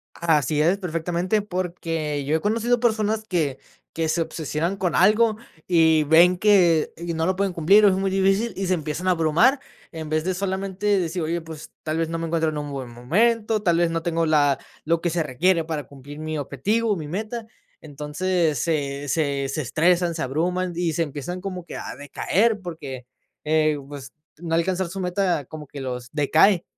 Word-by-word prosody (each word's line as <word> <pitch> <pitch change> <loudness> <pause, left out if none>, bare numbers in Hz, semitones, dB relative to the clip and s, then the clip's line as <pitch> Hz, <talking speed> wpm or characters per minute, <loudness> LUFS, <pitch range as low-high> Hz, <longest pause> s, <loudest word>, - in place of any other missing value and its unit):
Así 155 -2 +1
es 175 +5 +3
perfectamente, 175 +3 -1
porque 165 -6 -3
yo 150 +3 +1
he 160 - 0
conocido 230 +4 +1
personas 220 -2 +1
que 155 -8 -1 0.3
que 165 0 -1
se 165 +2 0
obsesionan 160 +3 -2
con 180 -3 -1
algo 215 +3 +4 0.3
y 160 -3 +4
ven 170 +4 +6
que 180 -6 +4
y 170 0 -5
no 160 0 -1
lo 185 +1 +1
pueden 195 0 0
cumplir, 180 +5 +4
o 205 - +7
es - - +2
muy 195 +1 0
difícil, 195 +4 +1
y 195 -1 -3
se 185 - +2
empiezan 160 +2 -2
a - - +5
abrumar, 175 - +3 0.3
en 160 -2 -6
vez 155 0 0
de 185 +2 -1
solamente 195 +2 -1
decir: 175 0 -2
"Oye, 165 +2 -1
pues, 160 -1 -10
tal 155 0 -2
vez, 165 0 0
no 165 +1 -3
me 165 - -3
encuentro 160 -1 +1
en 150 - -5
un 145 -1 -5
buen 135 -2 -5
momento, 215 - +1
tal 170 -5 +2
vez, 170 -1 +3
no 165 0 -1
tengo 165 0 0
la 145 -3 +3 0.3
lo 165 +1 +1
que 175 - 0
se 170 0 0
requiere 165 +5 +1
para 155 -2 -3
cumplir 145 +2 -11
mi 155 0 -4
objetivo 200 - -1
o - - +2
mi 155 -5 -6
meta". 220 +5 -4 0.3
Entonces, 155 +1 -1
se 145 -2 -2
se 140 -3 0
se 155 - -2
estresan, 170 +5 +2
se 160 - -4
abruman 175 +7 -1
y 170 -1 0
se 165 - +1
empiezan 160 +5 -6
como 185 -3 -6
que - - -9
a - - -6
decaer, 205 - 0
porque, 145 -8 -7 0.4
eh, 155 0 +2
pues, 135 -3 -9 0.2
no 165 0 -2
alcanzar 180 +2 0
su 190 +3 -7
meta 180 -3 0
como 150 +2 -9
que 140 0 -8
los 125 -2 -5
decae. 160 +5 +4
165 Hz, 195 wpm, -23 LUFS, 155-185 Hz, 0.4 s, o